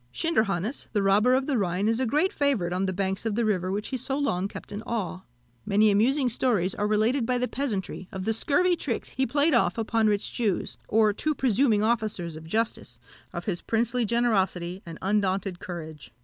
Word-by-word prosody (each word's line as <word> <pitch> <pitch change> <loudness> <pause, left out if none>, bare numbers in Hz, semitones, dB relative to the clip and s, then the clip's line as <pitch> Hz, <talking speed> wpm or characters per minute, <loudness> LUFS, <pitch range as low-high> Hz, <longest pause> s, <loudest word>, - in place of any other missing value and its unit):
Schinderhannes, 220 - 0
the 205 -2 +1
robber 210 +6 +4
of 265 0 +1
the 270 -5 0
Rhine, 190 +1 0
is 225 +1 +1
a 260 - +1
great 300 +10 +1
favourite 255 - +1
on 190 +1 0
the - - 0
banks 190 +1 -2
of 225 -3 -1
the 235 0 +1
river 185 -3 0
which 205 +2 -3
he 260 - -2
so 265 +2 -2
long 195 -10 0
kept - - -10
in 205 - -5
awe. 215 -6 -3 0.4
Many 210 - +3
amusing 255 +7 +3
stories 220 -6 +1
are 210 - -1
related 220 +5 +2
by 250 +2 0
the 250 0 0
peasantry 205 -9 -3
of 190 -1 -5
the 225 - +1
scurvy 350 +9 +2
tricks 250 -8 -3
he 265 - -1
played 290 +5 +2
off 205 -6 +2
upon 225 0 +1
rich 205 -1 0
Jews, 210 -7 -1
or 215 -1 +3
too 305 +8 0
presuming 235 -4 +2
officers 215 -7 -1
of 160 0 -10
justice 220 +7 -2 0.3
of - - -6
his 190 -6 -2
princely 235 +2 0
generosity, 195 -6 0
and 165 - -7
undaunted 195 -2 0
courage. 155 -8 -8
215 Hz, 200 wpm, -26 LUFS, 190-245 Hz, 0.4 s, robber